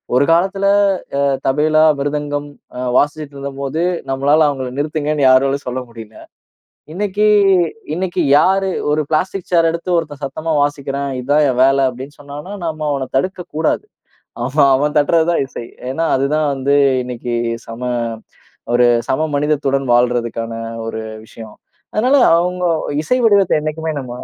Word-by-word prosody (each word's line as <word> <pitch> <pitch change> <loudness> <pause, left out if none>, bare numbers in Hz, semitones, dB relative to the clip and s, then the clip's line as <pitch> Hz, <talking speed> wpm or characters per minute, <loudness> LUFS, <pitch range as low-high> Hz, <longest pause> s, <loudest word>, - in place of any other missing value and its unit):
ஒரு 135 +3 +4
காலத்துல 195 +3 +1 0.6
அ - - +2 0.2
தபேலா, 155 +3 +3 0.2
மிருதங்கம் 145 0 -3 0.3
அ - - -3 0.2
வாசிச்சிட்டு 145 0 -1
இருந்தப்போது 140 +3 -4 0.3
நம்மளால 145 +4 +3
அவங்கள 130 -2 -4
நிறுத்துங்கன்னு 150 -1 0
யாராலும் 135 +2 +2
சொல்ல 130 +1 -3
முடியல. 110 -2 -11 0.8
இன்னைக்கி 205 +2 +1 0.7
இன்னைக்கி 180 0 -1 0.2
யாரு 190 +3 +2 0.2
ஒரு 155 +1 +1
பிளாஸ்டிக் 180 +4 -2
சேரெடுத்து 170 +1 +1
ஒருத்தன் 150 -3 -4
"சத்தமா 155 +4 -3
வாசிக்கிறேன். 140 -1 -3
இதான் 145 +4 +2
என் 125 -1 +1
வேலை" 135 0 +3
அப்படீன்னு 130 +4 -10
சொன்னா, 140 0 -9 0.3
நம்ம 155 -1 -3
அவனை 135 -2 -3
தடுக்கக்கூடாது. 165 -1 -2 0.6
ஆமா 140 +4 +2
அவன் 145 +2 0
தட்டுறது 160 +2 +3
தான் 170 - +1
இசை. 130 - -8 0.3
ஏன்னா 140 +5 -2
அதுதான் 145 +3 0
வந்து 140 +1 0 0.3
இன்னைக்கு 125 -1 -5 0.3
சம 115 +1 -8 0.9
ஒரு 120 0 +5 0.2
சம 155 +4 +1
மனிதத்துடன் 140 -2 0
வாழுறதற்கான 120 -1 0 0.3
ஒரு 110 0 -4 0.2
விஷயம். 110 -1 -12 0.4
அதனால 250 +6 +3 0.2
அவுங்க 180 +1 -1 0.4
இசை 250 +10 +1
வடிவத்தை 200 -4 +4
என்னைக்குமே 155 +1 -3
நம்ம 125 -2 -9
145 Hz, 130 wpm, -17 LUFS, 135-160 Hz, 0.9 s, ஒரு